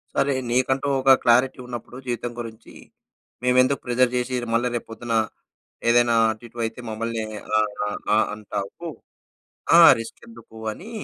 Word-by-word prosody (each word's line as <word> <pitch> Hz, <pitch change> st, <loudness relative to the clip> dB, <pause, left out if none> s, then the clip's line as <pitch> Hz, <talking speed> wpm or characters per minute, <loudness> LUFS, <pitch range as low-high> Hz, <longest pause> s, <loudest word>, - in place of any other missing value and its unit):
సరే 140 Hz, 0 st, +2 dB, 0.2 s
నీకంటూ 130 Hz, +2 st, +1 dB
ఒక 135 Hz, 0 st, +7 dB
క్లారిటీ 125 Hz, +2 st, +3 dB
ఉన్నప్పుడు 120 Hz, 0 st, -8 dB
జీవితం 120 Hz, 0 st, -3 dB
గురించి 110 Hz, -1 st, -10 dB, 0.7 s
మేమెందుకు 130 Hz, +2 st, +3 dB
ప్రెజర్ 125 Hz, 0 st, +2 dB
చేసి 125 Hz, +1 st, -2 dB, 0.2 s
మళ్ళా 120 Hz, +2 st, +2 dB
రేపు 120 Hz, -, -4 dB
పొద్దున 115 Hz, +1 st, -5 dB, 0.8 s
ఏదైనా 120 Hz, 0 st, +4 dB, 0.2 s
అటు 110 Hz, +2 st, -10 dB
ఇటు 120 Hz, +1 st, -13 dB
అయితే 110 Hz, +2 st, -6 dB
మమ్మల్ని 115 Hz, 0 st, -3 dB, 0.3 s
ఆహ్, 105 Hz, -1 st, +1 dB, 0.2 s
ఆ -, -, -2 dB, 0.3 s
ఆ -, -, +4 dB, 0.2 s
అంటావు. 105 Hz, +9 st, -6 dB, 0.9 s
ఆ! -, -, +9 dB, 0.2 s
రిస్క్ 115 Hz, -, -8 dB
ఎందుకు 115 Hz, -1 st, -15 dB, 0.2 s
అని 185 Hz, -, -10 dB
120 Hz, 140 wpm, -23 LUFS, 115-125 Hz, 0.9 s, ఆ